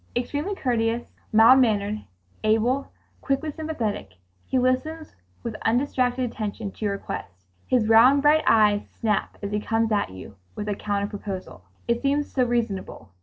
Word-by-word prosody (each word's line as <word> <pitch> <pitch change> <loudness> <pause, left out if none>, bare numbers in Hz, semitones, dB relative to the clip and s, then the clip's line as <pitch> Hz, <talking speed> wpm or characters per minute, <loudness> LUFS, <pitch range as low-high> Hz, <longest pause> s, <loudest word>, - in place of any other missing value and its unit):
Extremely 290 +10 -2
courteous, 235 -5 -1 0.2
mild 225 +4 +7
mannered, 210 -3 +1 0.4
able, 225 +5 +1 0.3
quickly 280 +3 -1
sympathetic, 245 - -4 0.3
he 260 - 0
listens 260 +6 -1 0.3
with 235 - -3
undistracted 250 +1 +1
attention 215 -3 -4
to 215 - -6
your 200 -1 0
request. 90 - -7 0.2
His 240 -4 +2
round 250 +6 +6
bright 305 +1 +5
eyes 210 -2 +4
snap 215 -3 -2
as 200 - -3
he 210 - 0
comes 225 +1 0
at 205 -1 +1
you 95 +1 -11 0.2
with 210 - -5
a 205 - 0
counter 200 0 -2
proposal. 200 - -7 0.2
It 235 0 +1
seems 285 +1 0
so 260 - +3
reasonable. 230 - -2
225 Hz, 150 wpm, -24 LUFS, 210-260 Hz, 0.4 s, mild